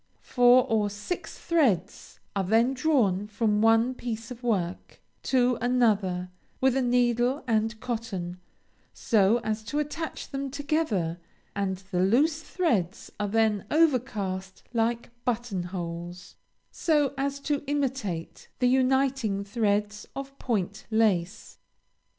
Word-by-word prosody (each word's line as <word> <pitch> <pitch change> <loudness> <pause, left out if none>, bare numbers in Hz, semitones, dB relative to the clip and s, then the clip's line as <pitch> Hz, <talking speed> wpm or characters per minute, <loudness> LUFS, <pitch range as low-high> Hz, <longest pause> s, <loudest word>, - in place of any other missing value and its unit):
Four 245 0 +5
or 215 -2 +1
six 210 - -5
threads 235 - 0 0.2
are 195 - +1
then 225 +7 +3
drawn 245 -9 +1
from 210 0 +1
one 225 +3 +4
piece 230 -1 -5
of 245 -1 -8
work 190 -7 -2 0.2
to 250 -2 +2
another, 205 -7 +1 0.3
with 265 -1 +3
a 270 - +2
needle 245 +2 +2
and 220 -1 0
cotton, 220 -8 -4 0.6
so 215 0 +3
as 215 0 -2
to 285 - -3
attach 300 +2 -4
them 275 0 -3
together, 270 - -1 0.4
and 195 -2 -1
the 180 - 0
loose 290 - +3
threads 235 - -1
are 210 - 0
then 215 -1 +1
overcast 215 - 0
like 235 +1 0
button 235 -5 -1
holes, 175 0 -6 0.4
so 295 -5 +1
as 280 +1 -2
to 290 -1 -1
imitate 265 - -3
the 250 - +2
uniting 260 -5 +2
threads 210 0 -1
of 275 0 -6
point 205 -4 -2
lace. 210 -5 0
225 Hz, 120 wpm, -27 LUFS, 200-265 Hz, 0.6 s, Four